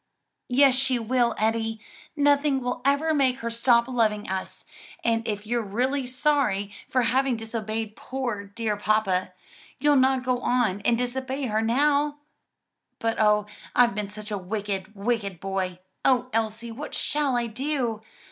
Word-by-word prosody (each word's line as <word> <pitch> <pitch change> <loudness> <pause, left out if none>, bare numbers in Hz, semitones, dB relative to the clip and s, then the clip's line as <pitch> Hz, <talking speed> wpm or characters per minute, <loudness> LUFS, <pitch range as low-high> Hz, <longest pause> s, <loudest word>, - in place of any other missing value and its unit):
"Yes, 270 +1 +5
she 260 0 +2
will, 235 0 +1
Eddie; 225 0 0 0.4
nothing 285 -1 +3
will 250 -1 -3
ever 285 +4 +2
make 265 -3 +2
her 235 0 -3
stop 235 0 +3
loving 220 -5 0
us; 190 0 -5 0.4
and 230 0 +1
if 210 -1 -3
you're 240 +2 0
really 250 +6 -1
sorry 255 -7 +1 0.2
for 255 -1 +2
having 255 +1 +2
disobeyed 220 -1 -4
poor, 240 -6 -4
dear 210 +1 -2
papa, 205 -3 +1 0.5
you'll 295 +2 +3
not 260 -1 +3
go 250 -1 0
on 240 -6 +1
and 235 - +4
disobey 260 +3 -3
her 220 -3 0
now." 285 +5 +2 0.8
"But 225 0 -1
oh 210 -1 +4 0.3
I've 245 -2 +5
been 205 0 -3
such 210 +1 -8
a 205 - -2
wicked, 200 +1 -4
wicked 200 -3 -2
boy. 190 -1 -2 0.3
O 255 -1 +2
Elsie, 225 +1 -1
what 275 +7 -7
shall 285 -4 +1
I 240 - 0
do? 240 -1 -2
235 Hz, 150 wpm, -26 LUFS, 215-260 Hz, 0.8 s, Yes